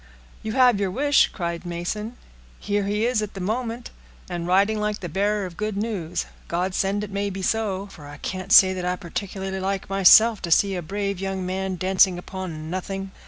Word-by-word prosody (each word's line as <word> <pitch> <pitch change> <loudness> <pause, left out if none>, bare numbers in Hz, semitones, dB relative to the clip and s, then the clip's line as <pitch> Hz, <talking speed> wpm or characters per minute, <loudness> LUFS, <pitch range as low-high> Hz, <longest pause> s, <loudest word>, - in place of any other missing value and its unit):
"You 220 - -4
have 250 -5 +4
your 200 -2 0
wish," 285 +8 +3
cried 170 -2 -4
Mason. 185 +7 -4 0.4
"Here 205 -1 -1
he 210 +2 0
is 240 -3 +1
at 210 -1 -5
the - - -6
moment, 230 +4 -3 0.4
and 175 -1 -4
riding 200 +4 +3
like 210 0 -1
the 180 - -5
bearer 205 +4 0
of 175 -2 -9
good 215 -1 -3
news. 200 -6 -2 0.2
God 180 +2 -1
send 200 +2 0
it 205 - -7
may 200 +1 -1
be 190 0 -6
so; 200 -2 -1
for 160 -7 -13
I 145 +1 -10
can't 185 +5 -5
say 190 -1 +8
that 185 -1 -4
I 180 0 0
particularly 190 +1 -5
like 195 0 -3
myself 205 +3 +6
to 175 - -4
see 195 +4 +4
a 180 - -3
brave 200 +2 -3
young 195 -1 -3
fellow 190 +1 -2
dancing 185 0 +3
upon 175 -4 -6
nothing." 195 +1 -4
195 Hz, 200 wpm, -24 LUFS, 180-210 Hz, 0.4 s, say